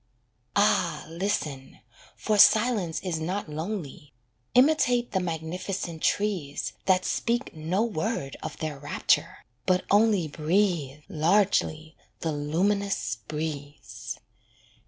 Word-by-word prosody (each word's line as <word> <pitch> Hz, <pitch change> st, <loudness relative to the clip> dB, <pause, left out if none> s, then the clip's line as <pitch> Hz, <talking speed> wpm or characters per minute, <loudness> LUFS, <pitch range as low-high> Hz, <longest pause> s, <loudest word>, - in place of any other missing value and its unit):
Ah 180 Hz, -6 st, +2 dB
listen, 160 Hz, -6 st, -3 dB, 0.4 s
for 215 Hz, -, 0 dB
Silence 215 Hz, -7 st, +5 dB
is 175 Hz, -4 st, -2 dB
not 180 Hz, +5 st, -3 dB
lonely: 155 Hz, -3 st, -5 dB, 0.4 s
Imitate 250 Hz, -3 st, +4 dB
the 190 Hz, -, +1 dB
magnificent 170 Hz, 0 st, -4 dB
trees 185 Hz, -9 st, -1 dB
That 185 Hz, -1 st, +3 dB
speak 240 Hz, +2 st, -1 dB
no 165 Hz, +7 st, 0 dB
word 205 Hz, -8 st, -2 dB
of -, -, -6 dB
their 155 Hz, -3 st, -4 dB
rapture, 145 Hz, -, 0 dB, 0.2 s
but 185 Hz, -1 st, +2 dB
only 205 Hz, -4 st, +4 dB
Breathe 155 Hz, -2 st, 0 dB
largely 160 Hz, -2 st, +1 dB, 0.3 s
the 165 Hz, -, -1 dB
luminous 155 Hz, -, 0 dB
breeze. 150 Hz, -2 st, -5 dB
170 Hz, 100 wpm, -27 LUFS, 155-205 Hz, 0.4 s, Silence